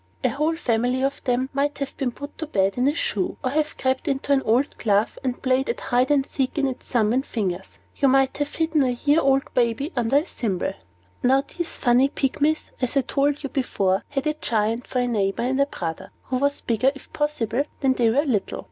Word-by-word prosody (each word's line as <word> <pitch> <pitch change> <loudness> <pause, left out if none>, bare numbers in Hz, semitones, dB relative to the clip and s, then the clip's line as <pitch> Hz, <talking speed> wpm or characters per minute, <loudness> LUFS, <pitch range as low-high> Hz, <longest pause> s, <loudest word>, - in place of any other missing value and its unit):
A - - +3
whole 305 +4 0
family 250 -3 0
of 275 +1 -1
them 255 +1 0
might 285 +1 0
have 275 -1 -4
been 265 -3 -1
put 285 +4 -9
to 315 - -3
bed 195 -8 +1
in 250 +2 +2
a 290 - +2
shoe, 200 - -1
or 255 - 0
have 305 +1 -1
crept 260 +4 -1
into 275 0 -1
an 275 -1 +4
old 250 +5 +1
glove, 205 0 +1
and 255 -2 -2
played 260 0 +1
at 235 - -1
hide 250 +2 +1
and 280 -2 +3
seek 265 +1 -2
in 285 - +2
its 260 - -6
thumb 225 -3 +2
and 260 +2 +1
fingers. 190 -7 -4 0.2
You 275 - +3
might 270 0 +3
have 290 0 -2
hidden 320 -2 +1
a 260 - +2
year 290 +5 +2
old 270 -1 +1
baby 245 +6 0
under 240 +1 +1
a 285 - +6
thimble. 210 - -2 0.5
Now 265 +2 +3
these 345 +3 -2
funny 250 +2 +4
Pygmies, 295 +3 0
as 255 +2 0
I - - +5
told 285 +3 0
you 275 - -3
before, 195 -9 0
had 275 0 -2
a 305 - +1
Giant 230 -4 -1
for - - -4
their 245 0 +2
neighbor 205 -2 0
and 265 +3 +2
brother, 170 - -5
who 255 - -2
was 285 +2 0
bigger, 235 +3 +2
if 275 - -14
possible, 280 -4 0 0.2
than 265 -2 +3
they 240 -3 +2
were 280 +7 +2
little. 225 -9 -1
265 Hz, 220 wpm, -24 LUFS, 235-285 Hz, 0.5 s, a